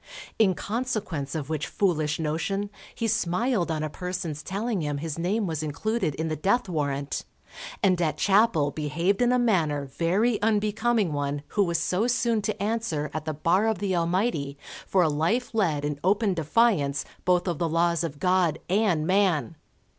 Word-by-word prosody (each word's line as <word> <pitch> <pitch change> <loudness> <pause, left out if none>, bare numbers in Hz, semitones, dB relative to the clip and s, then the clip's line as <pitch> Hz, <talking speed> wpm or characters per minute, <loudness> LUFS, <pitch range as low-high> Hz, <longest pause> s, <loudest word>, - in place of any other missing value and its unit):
In 195 -5 +4
consequence 205 - -3
of 150 -4 -3
which 155 -1 -2
foolish 155 -6 0
notion 165 +6 -2 0.2
he 230 - -1
smiled 210 0 0
on 155 -1 -1
a - - 0
person's 180 -4 -4
telling 200 +2 -2
him 145 -1 -2
his 160 +1 -4
name 200 +6 0
was 160 -4 -2
included 155 +3 -1
in 160 - -2
the 155 - -1
death 200 +10 +1
warrant, 145 -4 -2 0.6
and 185 -3 +3
at 155 -3 0
chapel 195 -8 +3
behaved 165 - -1
in 245 0 +4
a 250 - +3
manner 165 - +1
very 195 - 0
unbecoming 215 -2 +1
one 145 0 -2
who 205 - +2
was 170 -2 0
so 185 +6 0
soon 235 -2 +1
to 200 - -3
answer 205 -9 -1
at 155 -1 -4
the 155 - -2
Bar 180 +8 +2
of 220 - +1
the 190 0 -1
Almighty 170 -5 0 0.3
for 185 -2 +3
a - - +3
life 165 +13 0
led 160 -10 +1
in 145 -1 -3
open 200 +2 +2
defiance 160 -4 +2 0.2
both 180 0 +2
of 170 -4 -1
the 170 - 0
laws 170 +1 +2
of 155 -4 -4
God 180 -4 +2
and 190 -6 +2
man. 180 - +2
175 Hz, 175 wpm, -26 LUFS, 155-210 Hz, 0.6 s, In